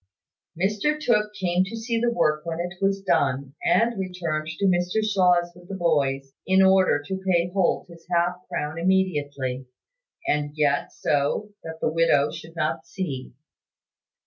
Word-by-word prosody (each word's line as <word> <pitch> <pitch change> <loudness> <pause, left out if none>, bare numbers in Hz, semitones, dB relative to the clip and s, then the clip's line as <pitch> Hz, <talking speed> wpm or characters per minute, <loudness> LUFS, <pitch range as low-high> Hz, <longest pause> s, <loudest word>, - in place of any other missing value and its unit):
Mr 210 +11 +1
Tooke 210 -7 +2
came 180 -1 +2
to 210 +4 -6
see 230 0 -2
the 240 - +3
work 150 -9 +1
when 165 0 -4
it 175 0 -3
was 195 0 +1
done, 140 -6 +1
and 230 -2 +2
returned 170 -5 -3
to 160 +5 -2
Mr 180 +3 +2
Shaw's 180 -4 +3
with 175 0 -16
the 195 - -4
boys, 140 -6 0
in 190 +1 +5
order 190 -6 +4
to 190 +4 -4
pay 175 -2 +1
Holt 190 -3 +1
his 170 -1 -15
half 175 +1 +2
crown 160 -2 -3
immediately, 145 -8 0 0.6
and 150 0 -1
yet 145 -2 +1
so 145 +9 0
that 160 0 -7
the - - +1
widow 165 -4 +3
should 165 +1 -10
not 155 -1 -2
see. 140 -11 -5
175 Hz, 155 wpm, -25 LUFS, 150-190 Hz, 0.6 s, in